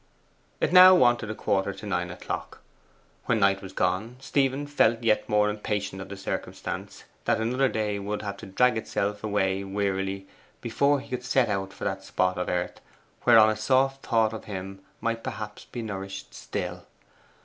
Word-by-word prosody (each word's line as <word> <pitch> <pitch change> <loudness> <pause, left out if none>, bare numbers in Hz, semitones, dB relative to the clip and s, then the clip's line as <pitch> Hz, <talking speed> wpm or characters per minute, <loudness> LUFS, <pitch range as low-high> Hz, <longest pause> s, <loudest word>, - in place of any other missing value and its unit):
It - - 0
now 185 0 +10
wanted 120 -7 +3
a 110 - -3
quarter 100 -1 0
to 95 - -10
nine 90 -3 -1
o'clock. 90 - -6 0.6
When 115 -2 +2
Knight 100 -1 +3
was 95 - -8
gone, 95 +7 -1
Stephen 135 0 0
felt 120 -5 +2
yet 110 -2 +2
more 105 0 +3
impatient 105 -2 -3
of - - -8
the 100 - -7
circumstance 95 - -5 0.2
that - - +2
another 125 +4 +1
day 105 -2 -1
would 105 +2 -4
have 100 -1 -4
to - - -10
drag 110 +4 +3
itself 105 -1 -2
away 100 -2 0
wearily 95 -1 -2 0.3
before 140 0 +1
he 140 - -14
could 125 -1 -4
set 125 -1 +2
out 95 -1 -2
for - - -10
that 95 0 -2
spot 90 -1 0
of 90 - -2
earth 90 0 -2 0.4
whereon 110 -1 +7
a - - -2
soft 135 +5 +1
thought 115 -1 +2
of 110 - -7
him 95 -1 -6 0.2
might 115 0 -2
perhaps 105 -1 -6
be 120 - -6
nourished 95 -2 -6
still. - - -5
105 Hz, 175 wpm, -27 LUFS, 95-120 Hz, 0.6 s, now